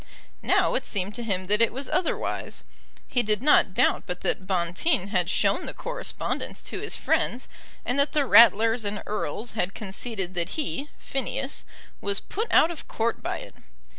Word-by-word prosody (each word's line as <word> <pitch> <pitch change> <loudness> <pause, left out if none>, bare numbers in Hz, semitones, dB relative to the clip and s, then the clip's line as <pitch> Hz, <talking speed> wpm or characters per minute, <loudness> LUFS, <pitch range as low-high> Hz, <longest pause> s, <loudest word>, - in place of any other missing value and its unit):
Now - - +3
it - - 0
seemed 200 0 -1
to 240 - -3
him 190 -4 -1
that 210 +3 +3
it 230 - +4
was 265 +2 -4
otherwise. 365 -2 -2 0.4
He 245 - +1
did 210 +1 0
not 275 -10 +4
doubt - - +2
but 180 0 -4
that 185 - -1
Bonteen 185 - 0
had 180 -3 +1
shown - - +1
the - - -6
correspondence - - -3
to - - -4
his - - -4
friends, 250 - 0 0.4
and 250 +3 0
that 280 - +2
the 295 -2 +2
Ratlers 225 -1 +6
and 205 0 -3
Erles 215 +2 -3
had 195 -3 -1
conceded 195 -2 -4
that 175 - -2
he, 295 -1 -3
Phineas, 270 +1 -3 0.4
was 200 0 0
put 440 +4 -4
out 330 - +6
of 330 - -7
court 230 +1 -1
by - - -3
it. - - -11
220 Hz, 175 wpm, -26 LUFS, 190-270 Hz, 0.4 s, Ratlers